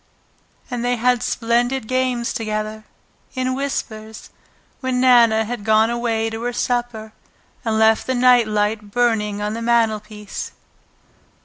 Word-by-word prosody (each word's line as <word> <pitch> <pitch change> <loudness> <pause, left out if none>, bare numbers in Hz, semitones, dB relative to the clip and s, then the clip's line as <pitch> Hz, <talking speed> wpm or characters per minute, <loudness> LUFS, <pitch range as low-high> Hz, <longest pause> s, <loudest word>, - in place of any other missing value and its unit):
And 240 -1 -3
they 245 0 +1
had 245 0 +1
splendid 240 +1 0
games 255 -1 0
together, 215 -1 -4 0.5
in 255 0 -1
whispers, 220 -5 -5 0.5
when 260 -1 -1
Nana 235 -3 +5
had 235 -1 -5
gone 220 +2 +3
away 225 -2 -1
to 225 0 -5
her 245 +1 -2
supper 240 -3 -2 0.5
and 225 -2 0
left 220 0 +3
the 260 - 0
night 245 -2 +5
light 210 0 -1
burning 210 -3 0
on 210 +1 -2
the 230 - -5
mantelpiece. 215 -3 -1
230 Hz, 130 wpm, -20 LUFS, 215-245 Hz, 0.5 s, Nana